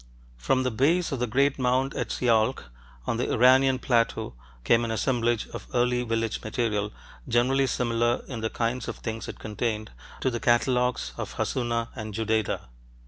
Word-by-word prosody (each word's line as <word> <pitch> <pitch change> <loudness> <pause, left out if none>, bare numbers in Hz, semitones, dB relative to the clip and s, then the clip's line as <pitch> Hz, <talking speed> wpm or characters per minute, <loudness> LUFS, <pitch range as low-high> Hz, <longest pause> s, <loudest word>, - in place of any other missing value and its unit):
From 130 - +1
the 125 - 0
base 160 +10 +2
of 135 - -2
the 125 - 0
great 135 +4 +2
mound 130 +2 +1
at - - -2
Sialk 115 - +1 0.3
on 115 - -1
the 120 - -1
Iranian 130 +2 +5
plateau 115 - 0 0.3
came 115 - +4
an 115 - -2
assemblage 120 0 0
of - - -8
early 125 0 +2
village 115 -2 -1
material, 105 -2 -1 0.4
generally 130 +3 +2
similar, 120 -1 0
in 120 -4 -5
the 110 - -1
kinds 115 +1 -2
of - - -4
things 115 0 -5
it - - -7
contained, 110 0 -3 0.3
to 130 - +1
the 120 - -2
catalogues 125 +1 +2
of - - -5
Hassuna 115 -2 -1
and 110 -4 -6
Judaidah. 110 -1 0
120 Hz, 165 wpm, -26 LUFS, 115-130 Hz, 0.4 s, Iranian